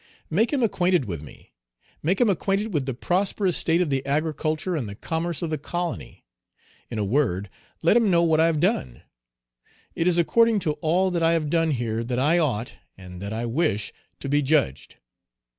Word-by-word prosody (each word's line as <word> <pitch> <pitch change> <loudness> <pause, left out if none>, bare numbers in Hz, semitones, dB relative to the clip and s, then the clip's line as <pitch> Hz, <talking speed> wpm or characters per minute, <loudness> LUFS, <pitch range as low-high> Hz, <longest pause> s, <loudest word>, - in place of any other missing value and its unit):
Make 215 +9 +2
him 275 -4 +1
acquainted 180 - +2
with 85 -8 -5
me; 75 - -15 0.5
make 185 +6 0
him 245 - +4
acquainted 200 +2 0
with 140 -4 -1
the 135 - -2
prosperous 185 - 0
state 165 +2 +2
of 165 -5 0
the 135 -1 0
agriculture 155 +4 -1
and 125 -9 -3
the 100 - -8
commerce 165 +7 -3
of 165 - -3
the 155 - -2
colony; 175 +3 -5 0.6
in 115 - -5
a 105 - 0
word, 100 -5 0 0.3
let 170 - +4
him 230 -3 +4
know 170 -2 +4
what 160 -2 +3
I 165 - +5
have 160 -2 0
done. 65 - -1 0.9
It 165 - -1
is 175 -1 +3
according 230 +6 +3
to 160 - 0
all 180 +3 +2
that 170 -1 -1
I 165 0 +3
have 155 -3 -1
done 165 -1 +2
here 115 -5 -1
that 120 +1 -3
I 150 +7 +3
ought, 125 -8 -1 0.2
and 90 -1 -10
that 100 +1 -5
I 115 +2 -3
wish, 115 -5 -1 0.3
to - - -4
be 145 +2 +2
judged. 135 - 0
155 Hz, 195 wpm, -24 LUFS, 120-175 Hz, 0.9 s, I